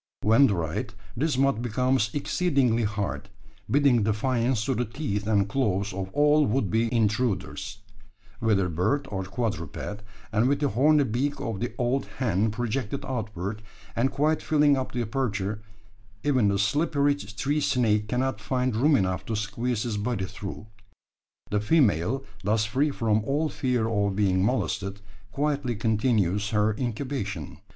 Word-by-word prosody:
When 115 +6 +6
dried, 100 +3 -2 0.2
this 145 +1 0
mud 135 -4 +2
becomes 125 0 +1
exceedingly 135 -7 +1
hard 100 -1 -3 0.4
bidding 140 -4 +4
defiance 115 +2 +1
to 135 - +1
the 125 0 0
teeth 110 -4 -3
and 100 -2 +2
claws 100 -4 0
of 95 0 -4
all 150 +1 +4
would 105 -4 0
be 115 +1 +1
intruders, 105 - -1 0.6
whether 105 -5 +2
bird 90 - 0
or 95 -1 -2
quadruped; 100 - -4 0.3
and 110 +3 +2
with 140 0 +1
the 145 - +1
horny 145 +7 +4
beak 135 +4 -1
of 110 -4 -3
the 120 - -3
old 125 +2 0
hen 110 -4 +1
projected 120 +3 -3
outward, 105 -5 -4 0.3
and 125 +3 +2
quite 150 +3 +1
filling 150 -2 +4
up 130 -1 -3
the 120 -1 -1
aperture, 105 -4 -2 0.6
even 130 -7 +3
the 100 0 +2
slippery 145 +6 +2
tree 140 +4 -2
snake 110 -7 +2
cannot 125 -1 -1
find 125 +1 0
room 145 +6 +4
enough 95 -5 0
to 115 - -1
squeeze 110 +2 -2
his 115 -4 -2
body 105 -2 -1
through. 100 +2 -7 0.9
The 105 - +2
female, 120 - +2 0.2
thus 105 +2 +2
free 135 +8 +1
from 110 -5 +1
all 145 +6 0
fear 125 -6 0
of 100 -3 0
being 95 -2 +2
molested, 100 -4 -1 0.3
quietly 140 -3 -1
continues 105 -2 +1
her 105 0 +2
incubation! 115 - -4
115 Hz, 145 wpm, -26 LUFS, 105-135 Hz, 0.9 s, When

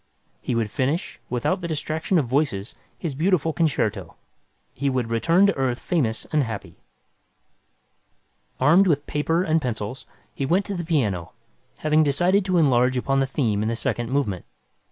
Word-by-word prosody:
He 125 - -2
would 110 -3 -1
finish, 140 - -2
without 125 +10 -1
the 170 - -3
distraction 155 +3 -1
of 150 - +2
voices, 120 -6 -1 0.2
his 165 -5 -4
beautiful 165 +1 +1
concerto. 155 -3 -1 0.6
He 140 +1 -1
would 125 -3 -1
return 165 - +3
to 200 - +2
Earth 130 -3 0
famous 120 -11 -1
and 150 -2 +3
happy. 110 -4 -6 1.8
Armed 165 +9 +5
with 145 -3 +1
paper 160 +4 0
and 160 -2 +1
pencils, 120 -1 -4 0.3
he - - -4
went 175 +9 +2
to 200 - -4
the 175 -2 -3
piano, 110 - -1 0.4
having 155 0 +2
decided 175 +7 +3
to 185 -2 +1
enlarge 130 -4 +3
upon 135 +2 +1
the 135 - +1
theme 115 -7 0
in 110 - 0
the 115 - -1
second 120 0 -2
movement. 130 -10 -1
140 Hz, 160 wpm, -24 LUFS, 120-165 Hz, 1.8 s, Armed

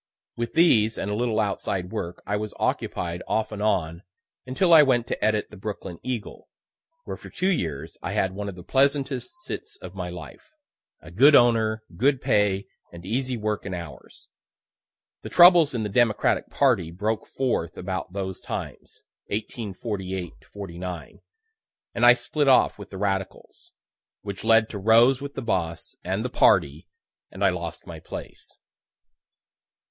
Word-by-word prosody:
With 120 0 -4
these 115 -10 +4
and 100 - -3
a - - -1
little 115 -1 0
outside 95 -3 -2
work 85 +1 -5
I 105 - -1
was 105 0 -4
occupied 85 0 -2
off 110 0 -1
and 105 -1 -6
on, 85 -5 0 0.5
until 170 +7 +2
I 160 - +10
went 125 -5 +3
to - - -3
edit 110 -1 +1
the 105 - -11
"Brooklyn 95 -3 -6
Eagle," 125 -4 -6 0.5
where - - -6
for - - -12
two 185 - -1
years 80 - -3
I - - -4
had 95 -1 0
one 100 +1 -4
of 95 - -8
the 90 - -11
pleasantest 135 - +1
sits 420 +3 -7
of - - -10
my - - -5
life 310 - -11 0.5
a 80 - -13
good 140 - +6
owner, 110 -3 +3
good 135 +2 +2
pay, 100 -3 +1 0.3
and 85 0 -11
easy 125 +4 -2
work 105 -1 -2
and 95 -2 -4
hours. 85 -1 -10 0.9
The - - -7
troubles 175 -5 +7
in 115 - -1
the - - -1
Democratic 110 +1 +1
party 120 - +2
broke 105 +6 -2
forth 115 -10 -2
about 95 -1 -4
those 95 -1 -5
times - - -7 0.2
(1848 100 -4 -4 0.2
'49) 90 -4 -7 0.7
and 120 - -2
I 120 - +10
split 145 +3 -1
off 130 -5 +4
with 100 - -9
the 95 - -8
radicals, 95 -1 -4 0.5
which 100 -2 -6
led 115 0 +5
to 105 - -6
rows 115 +6 +5
with 140 0 -7
the 135 - -4
boss 85 -7 -2
and - - -2
"the - - -1
party," 70 +3 +3 0.4
and 100 +1 -2
I - - +6
lost 85 -2 -6
my - - -9
place. - - -10
105 Hz, 160 wpm, -25 LUFS, 95-125 Hz, 0.9 s, I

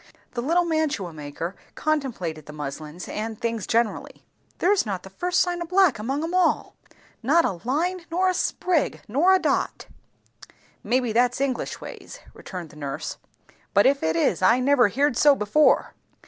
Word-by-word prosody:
The 240 - -3
little 340 +7 +2
mantua 310 - -1
maker 155 +4 -6 0.2
contemplated 225 - -2
the 150 - -9
muslins, 150 +3 -7
and 220 0 -5
things 230 -3 -2
generally. 230 -1 -1 0.3
"There's 395 +1 +3
not 195 -5 -4
the 190 - -12
first 360 - 0
sign 350 -1 0
o' - - -2
black 365 - +3
among 270 +8 -2
'em 330 +2 -3
all! 365 -2 +1 0.5
Not 310 +8 +3
a 180 - -2
line, 345 +6 -1
nor 365 +3 +1
a 370 - +2
sprig, 355 -2 0
nor 290 - +3
a 380 - +6
dot." - - -1 1.0
"Maybe 245 -2 0
that's 245 +2 +2
English 270 -3 -2
ways," - - -10
returned 175 -5 -8
the - - -15
nurse; 140 -2 -5 0.6
"but 200 - +6
if 275 +1 +3
it 160 0 0
is, 165 +2 +1
I 230 +7 +5
never 255 -2 +4
heerd 275 +5 +1
so 290 -1 +6
before." 240 +7 +3
250 Hz, 165 wpm, -24 LUFS, -, 1.0 s, a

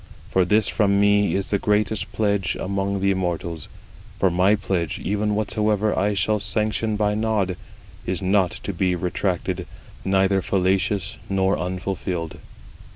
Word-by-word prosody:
For 95 -1 +3
this 105 +2 +3
from 100 -2 +2
me 100 0 +3
is 95 0 -2
the 100 - +2
greatest 105 -3 0
pledge 100 -3 0
among 100 0 -1
the 100 0 +3
immortals: 85 -4 -3 0.5
for 95 - +2
my 95 +4 +4
pledge, 90 -6 -2
even 105 +1 -1
whatsoever 105 0 +1
I 100 +2 +1
shall 105 +3 +1
sanction 110 +1 -1
by 105 0 +1
nod, 105 -4 0 0.5
is 95 - -2
not 95 -1 +2
to 100 - -3
be 90 0 +1
retracted, 90 +1 -2 0.4
neither 95 0 +2
fallacious 95 +2 0
nor 95 0 +2
unfulfilled." 90 -2 -3
100 Hz, 140 wpm, -23 LUFS, 95-105 Hz, 0.5 s, my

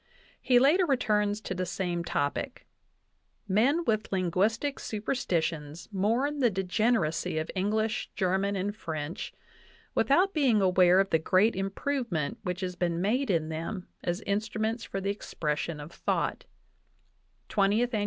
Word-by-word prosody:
He 250 - +4
later 315 +9 +5
returns 210 -6 +1
to 190 - -4
the 185 0 -2
same 175 -1 -2
topic: 170 - -2 0.8
"Men 260 - +2
with 215 -4 0
linguistic 200 - 0
super 215 +2 -3
stitions 165 - -2
mourn 240 +10 +1
the 250 -3 +4
degeneracy 185 -4 0
of 155 +1 -2
English, 215 +3 0
German, 190 +2 +1
and 200 +2 -2
French 160 -4 -5 0.6
without 365 +8 +3
being 265 -8 +3
aware 185 -1 +5
of 195 0 +1
the 160 - +4
great 185 +7 +3
improvement 195 - -2
which 180 0 -3
has 180 -1 -3
been 170 -1 -1
made 240 +9 +1
in 160 -4 +1
them 165 +4 -5
as 175 +3 -1
instruments 215 +3 -1
for 195 - -4
the 195 +1 -1
expression 155 -5 -3
of 145 +3 -8
thought" - - -1 1.0
(20th 215 +5 +2
Ann. 215 - +1
195 Hz, 140 wpm, -29 LUFS, 175-225 Hz, 1.0 s, later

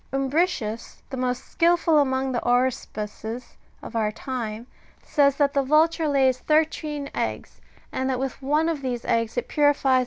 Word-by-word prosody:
• - - +1
Umbricius, 270 -6 -1
the - - -3
most 250 -1 -2
skilful 335 -2 +3
among 265 -1 +1
the 245 - 0
aruspices 240 -2 -2 0.3
of - - -9
our 215 -2 +1
time, 230 -2 -5 0.4
says 280 -2 +3
that 280 -1 +2
the 280 - +3
vulture 310 +3 +3
lays 265 -3 +3
thirteen 305 -1 0
eggs,^^ - - -4 0.3
and 260 0 -1
that 260 - 0
with 265 +1 -4
one 300 +4 +1
of 330 -3 -1
^ - - -14
See 255 -2 -2 0.4
Virgil, 290 +1 +2
Mn. 260 - +5
270 Hz, 160 wpm, -24 LUFS, 250-300 Hz, 0.4 s, Mn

